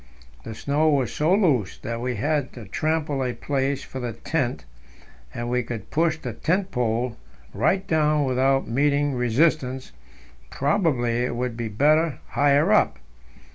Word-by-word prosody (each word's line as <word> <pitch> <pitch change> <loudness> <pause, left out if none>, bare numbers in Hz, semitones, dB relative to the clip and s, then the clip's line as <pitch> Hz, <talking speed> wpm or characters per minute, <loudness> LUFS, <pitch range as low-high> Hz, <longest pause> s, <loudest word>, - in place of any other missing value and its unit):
The 110 - -7
snow 145 +6 +1
was 135 -5 +1
so 155 +3 +1
loose 145 - +1
that 115 0 -5
we 125 0 -2
had 145 +4 -1
to 120 -4 -9
trample 155 +2 -1
a 125 -1 -2
place 140 0 -2
for 130 - -7
the 120 -2 -4
tent, 120 - -2 0.7
and 120 0 -5
we 125 +1 +1
could 115 -4 -7
push 160 0 +1
the - - -6
tent 185 +4 -1
pole 120 0 -1 0.4
right 175 - +1
down 150 -2 +2
without 135 +1 +1
meeting 145 +3 +1
resistance; 130 +1 +1 0.6
probably 140 - +1
it 125 - -2
would 125 -1 -2
be 115 -1 -3
better 150 +6 +2
higher 145 0 +3
up. - - +3
135 Hz, 150 wpm, -24 LUFS, 120-155 Hz, 0.7 s, higher